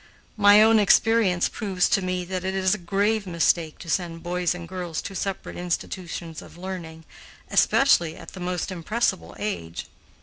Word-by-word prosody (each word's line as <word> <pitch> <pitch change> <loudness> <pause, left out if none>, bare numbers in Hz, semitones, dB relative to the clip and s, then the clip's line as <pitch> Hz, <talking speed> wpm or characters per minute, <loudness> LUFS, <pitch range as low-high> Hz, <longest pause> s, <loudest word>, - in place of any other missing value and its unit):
My 205 0 +7
own 225 0 +5
experience 205 -3 +3
proves 190 -5 0
to 195 - +2
me 185 -1 -2
that 185 0 -4
it 190 0 -2
is 185 -1 +2
a 215 - -2
grave 200 +4 0
mistake 170 -2 +1
to 175 - -11
send 165 0 -2
boys 180 0 -1
and 170 -1 -8
girls 175 -2 -4
to 195 - -6
separate 195 +1 -4
institutions 175 -2 -4
of - - -14
learning, 170 -3 -7 0.5
especially 170 -12 +3
at - - -11
the 190 - -11
most 180 0 -3
impressible 190 +3 -2
age. 85 - -4
180 Hz, 165 wpm, -24 LUFS, 170-200 Hz, 0.5 s, My